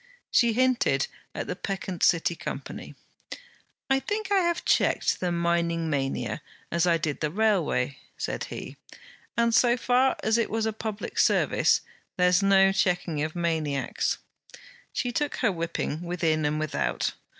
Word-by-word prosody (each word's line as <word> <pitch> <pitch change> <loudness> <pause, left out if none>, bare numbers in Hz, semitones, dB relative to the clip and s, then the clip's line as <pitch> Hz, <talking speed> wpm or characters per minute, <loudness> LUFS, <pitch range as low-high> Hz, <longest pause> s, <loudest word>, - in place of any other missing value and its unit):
She 235 -2 +4
hinted 245 - +2 0.3
at - - -3
the 180 - -4
peccant 190 -2 -4
City 170 0 +3
Company. - - -7 0.9
'I 270 0 +3
think 415 +6 -3
I 400 - +5
have 345 -2 0
checked - - +2
the 180 -1 -1
mining 170 -1 0
mania, 135 -2 -2 0.3
as 170 +1 +2
I 170 -1 +4
did 155 -3 -3
the 150 - 0
railway,' 175 - +1 0.2
said - - -3
he; - - -8 0.6
'and 235 0 +3
so 240 +1 +4
far 255 +2 +3
it 225 +1 +2
was 225 0 -1
a 220 - -1
public 220 -1 -5
service. - - +3 0.4
There's 180 +1 +4
no 195 -1 +5
checking 180 -5 0
of 155 +2 -3
maniacs.' 155 -7 -1 0.7
She 245 - -2
took 295 +4 -1
her 230 -5 +1
whipping 165 -2 -3
within 165 -3 0
and 150 +1 0
without. 70 - -1
180 Hz, 145 wpm, -27 LUFS, 160-225 Hz, 0.9 s, I